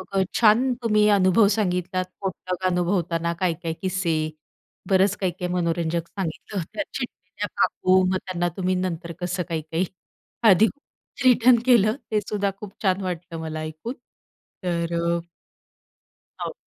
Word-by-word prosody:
मग 190 - +4 0.2
छान 240 +3 +5
तुम्ही 210 -2 +4
अनुभव 200 +1 +5
सांगितलात 185 -3 0 0.2
पोटलक 185 -1 -3
अनुभवताना 175 -2 0
काय-काय 170 -2 -1
किस्से, 185 -3 0 0.7
बरंच 195 +1 +4
काही-काही 180 -1 -2
मनोरंजक 170 -1 0
सांगितलं, 190 +1 -4
त्या 310 - -1
चिडलेल्या 205 -5 -5
काकू, 185 0 +3
मग 185 - +2
त्यांना 175 -2 -1
तुम्ही 185 0 +1
नंतर 175 -2 -3
कसं 180 0 -2
काही-काही. 160 +2 -1 0.6
आधी 205 +2 +7
खूप 285 +1 -11
रिटर्न 250 0 +6
केलं 225 -3 +5 0.2
तेसुद्धा 205 -1 0
खूप 205 -2 -9
छान 190 0 +2
वाटलं 175 -2 -4
मला 155 -1 -4
ऐकून. 155 +9 -5 0.7
तर 170 -1 -1 1.5
हो. - - -4
185 Hz, 120 wpm, -24 LUFS, 170-205 Hz, 1.5 s, आधी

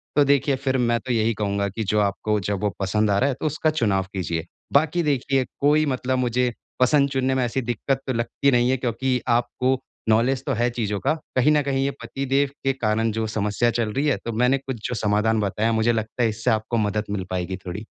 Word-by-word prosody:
तो 145 - +6
देखिए 140 0 +3
फिर 130 0 -1
मैं 120 -1 +1
तो 130 - -5
यही 115 0 +2
कहूँगा 100 -1 -1
कि 110 +3 -4
जो 105 +2 +1
आपको 105 +1 0
जब 100 +1 -2
वो 105 - +2
पसंद 105 +2 +1
आ 100 - +2
रहा 140 - +2
है 130 - -1
तो - - -4
उसका 155 +1 +1
चुनाव 105 -11 +1
कीजिए। 85 -3 -2 0.3
बाकी 160 +4 +3
देखिए 135 -2 +1
कोई 150 +2 +4
मतलब 130 -1 -1
मुझे 125 0 +1 0.3
पसंद 140 +2 +4
चुनने 130 0 0
में 130 - +1
ऐसी 130 +3 -1
दिक्कत 125 +3 -2
तो 130 - 0
लगती 115 +4 0
नहीं 120 0 +3
है 130 - +1
क्योंकि 125 +1 -1 0.2
आपको 125 +2 0 0.3
नॉलेज 120 +4 +2
तो 140 - 0
है 120 +1 +2
चीज़ों 105 -4 -2
का, 155 - +1 0.2
कहीं 140 +4 +4
न 150 - +3
कहीं 135 -1 0
ये 140 - 0
पति 120 +4 -4
देव 135 +1 +2
के 135 0 +2
कारण 110 -2 0
जो 110 +1 -2
समस्या 110 +2 0
चल 115 -2 -1
रही 140 +2 0
है, 140 - +2
तो 115 - -2
मैंने 125 +4 +3
कुछ 135 -1 -5
जो 125 - -2
समाधान 110 +1 +1
बताया, 105 +3 0
मुझे 110 +1 +2
लगता 110 +2 -2
है 115 - +3
इससे 110 +2 -2
आपको 110 +2 0
मदद 105 0 0
मिल 95 -3 -2
पाएगी 95 0 -2
थोड़ी। 90 +2 -5
120 Hz, 230 wpm, -23 LUFS, 105-135 Hz, 0.3 s, तो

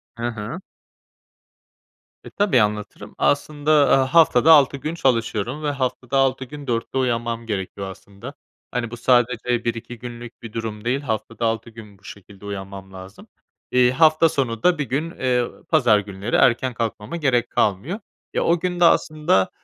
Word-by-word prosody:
Hı 120 +1 -3
hı. 115 - -5 1.6
E, - - -10
tabii 195 - +2
anlatırım. 105 0 -3
Aslında, 145 +1 0
aaa, 140 -2 +4
haftada 160 -2 +6
6 140 -2 +6
gün 155 +4 -4
çalışıyorum 120 0 -1
ve 145 - 0
haftada 130 -1 -2
6 135 0 +1
gün 145 +1 -10
04.00'te 115 +2 -2
uyanmam 115 -2 -1
gerekiyor 100 -2 -4
aslında. 100 +1 -11 0.4
Hani, 120 -2 -3
bu 120 - -7
sadece 120 -1 +1
1-2 115 +1 -4
günlük 120 -1 -9
bir 115 -2 -9
durum 110 -1 -5
değil, 130 +4 0
haftada 115 -2 -3
6 115 +1 -1
gün 105 -3 -13
bu - - -32
şekilde 100 0 -13
uyanmam 95 -1 -7
lazım. 95 +1 -12 0.4
İii, 125 0 +4
hafta 155 +3 +4
sonu 115 -6 -2
da 180 -2 +4
1 150 - -1
gün, 155 +6 -2
eee, 125 -2 0 0.2
pazar 120 -10 +4
günleri 100 +2 -4
erken 125 +1 +3
kalkmama 115 +4 -4
gerek 130 -7 +1
kalmıyor. 125 - 0 0.3
E, - - 0
o 170 0 +2
gün 180 0 -2
de 175 - +5
aslında, 155 - +2
120 Hz, 160 wpm, -22 LUFS, 110-140 Hz, 1.6 s, haftada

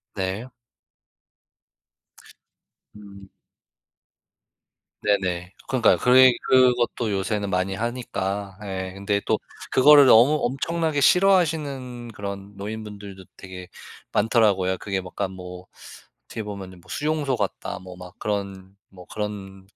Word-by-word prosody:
네. 95 +5 -3 2.5
음. 100 -2 -13 1.7
네네. 95 -3 -1
그러니까요 130 -3 +3
그리 130 0 +6
그것도 125 -3 +3
요새는 100 +1 -2
많이 95 +1 0
하니까 100 -4 -4
예 95 -2 -5
근데 100 +1 -1
또 - - +2 0.3
그거를 145 +2 +7
너무 130 +6 +6
엄청나게 155 +3 -1
싫어하시는 145 -9 +2
그런 100 0 -7
노인분들도 100 -2 -8
되게 90 -1 -10 0.4
많더라고요. 100 -4 +2
그게 95 -2 -3
뭐 90 0 -11
약간 95 - -3
뭐 90 0 -10 0.6
어떻게 115 - -6
보면은 95 -3 -8
뭐 - - -22
수용소 150 -3 -1
같다 100 -5 -3
뭐 90 0 -11
막 90 0 -12
그런 100 -2 -4
뭐 90 -2 -14
그런 100 -2 -6
100 Hz, 240 characters per minute, -24 LUFS, 95-125 Hz, 2.5 s, 그거를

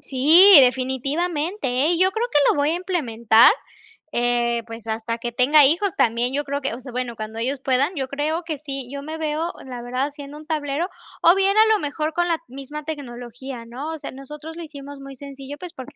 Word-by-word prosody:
Sí, 320 +7 +7
definitivamente, 280 - 0
¿eh? 260 +7 +2
Y 340 - 0
yo 375 - +4
creo 450 +4 -1
que 295 - +2
lo - - +1
voy 290 +1 +2
a - - 0
implementar, 240 - +3 0.6
eh, 240 -1 0
pues, 225 -1 -9
hasta 225 +1 -3
que 240 +1 -5
tenga 275 +5 +5
hijos 345 +7 +2
también. 235 +2 +1
Yo 290 - -1
creo 280 0 -4
que, 270 - -2
o - - -9
sea, 255 0 -10
bueno, 245 -1 -3
cuando 220 +1 -7
ellos 260 +4 -2
puedan, 275 +6 0
yo 265 -2 -3
creo 305 +5 -2
que 320 -3 -4
sí. 275 -4 -5
Yo 280 0 -6
me 310 +3 -6
veo, 320 +2 -2
la 250 -2 -7
verdad, 250 +2 -2
haciendo 290 0 -10
un 305 - -12
tablero 305 +1 -2 0.3
o 340 +3 +6
bien, 390 +2 +2
a 440 0 +6
lo 425 - +1
mejor, 305 +1 -3
con 350 +1 0
la 335 -2 +1
misma 275 +4 -8
tecnología, 245 -4 -7
¿no? 260 +7 -6
O 320 - -7
sea, 280 - -7
nosotros 300 +4 -10
lo 340 - -7
hicimos 285 -2 -10
muy 275 0 -10
sencillo, 275 +1 -9
pues 355 0 -9
porque 265 +2 -11
280 Hz, 220 wpm, -22 LUFS, 250-315 Hz, 0.6 s, Sí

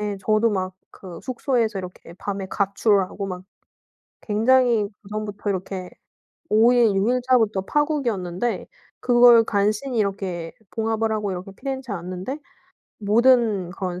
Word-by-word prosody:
예 210 -1 -2
저도 215 +2 +2
막 185 -2 -2 0.2
그 180 -3 -11
숙소에서 240 -5 -1
이렇게 180 -2 -9
밤에 195 0 -5
가출하고 200 0 0
막 185 -1 -6 0.8
굉장히 230 0 +2
그전부터 210 0 -4
이렇게 185 -1 -4 0.6
5 225 +3 +5
일 230 -5 +4
6 200 +4 +2
일자부터 245 -5 +2
파국이었는데 240 - -1 0.3
그걸 240 -2 +6
간신히 215 +5 0
이렇게 190 -5 -2 0.2
봉합을 225 0 -1
하고 210 -2 -1
이렇게 185 +2 -6
피렌체에 265 -5 -5
왔는데 185 - -5 0.6
모든 215 -3 +3
그런 180 -2 -5
210 Hz, 285 characters per minute, -23 LUFS, 190-235 Hz, 0.8 s, 그걸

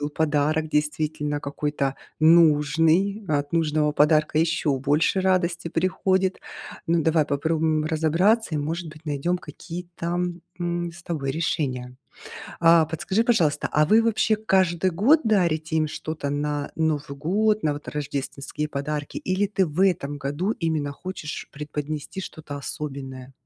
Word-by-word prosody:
был 145 0 -2
подарок 155 +1 +1
действительно 150 0 -1
какой-то 140 -1 -2 0.3
нужный. 165 +5 +4
От 145 -1 -1
нужного 155 -2 +1
подарка 150 0 +3
еще 160 -3 +1
больше 150 +7 +2
радости 185 -2 +1
приходит. 185 +2 0 0.5
Ну, 165 0 +3
давай 160 0 +3
попробуем 155 +1 0
разобраться 165 +6 +2
и, - - 0
может 165 +3 -3
быть, 155 +1 -13
найдем 155 +4 -1
какие-то, 170 +2 -6 0.4
м, 175 -1 -2
с 175 - -13
тобой 145 -5 -2
решения. 130 -6 -2 0.6
А, 165 -1 +6
подскажи, 175 +7 0
пожалуйста, 165 -12 +2
а 150 0 +3
вы 220 +6 +5
вообще 220 -1 +2
каждый 190 -4 +2
год 245 - +4
дарите 165 -7 +1
им 155 -1 +2
что-то 155 -1 -5
на 145 0 -2
Новый 150 -3 -1
год, 210 +8 +1
на 150 - +2
вот 145 0 -8
рождественские 145 +1 -4
подарки? 145 +1 -4
Или 185 +2 0
ты 195 -1 +1
в 155 +4 -3
этом 145 -6 0
году 145 +8 -2
именно 155 -6 -2
хочешь 165 0 -6
преподнести 150 +4 -5
что-то 155 -5 -8
особенное? 135 -2 -6
155 Hz, 135 wpm, -24 LUFS, 145-175 Hz, 0.6 s, А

